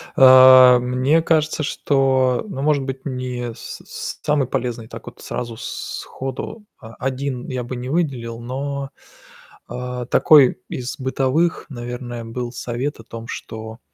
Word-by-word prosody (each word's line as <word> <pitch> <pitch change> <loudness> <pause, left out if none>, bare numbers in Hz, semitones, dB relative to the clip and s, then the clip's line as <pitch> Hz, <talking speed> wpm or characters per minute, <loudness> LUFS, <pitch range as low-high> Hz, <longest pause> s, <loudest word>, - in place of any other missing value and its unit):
А, 130 -1 +9
мне 130 +6 +2
кажется, 155 -1 +1
что 135 -2 +1
ну 135 - -5
может 145 -1 +2
быть, 130 0 -6
не 125 -3 -4
с - - -9
с - - -6
самый 145 -4 +1
полезный, 120 -4 -3
так - - -10
вот - - -11
сразу 120 -2 -5
сходу, 135 - -6
а, 115 -3 -12
1 130 -1 -3
я 130 -2 -3
бы 125 +2 -6
не 125 +1 -5
выделил, 130 -8 -2
но 135 +3 -4 0.8
А, 125 0 -5
такой 140 -3 +5
из 125 0 -5
бытовых, 135 +6 0
наверное, 120 -1 -6
был 120 +1 -5
совет 125 +2 -4
о - - -11
том, 115 +1 -9
что 110 -1 -7
130 Hz, 140 wpm, -21 LUFS, 120-135 Hz, 0.8 s, А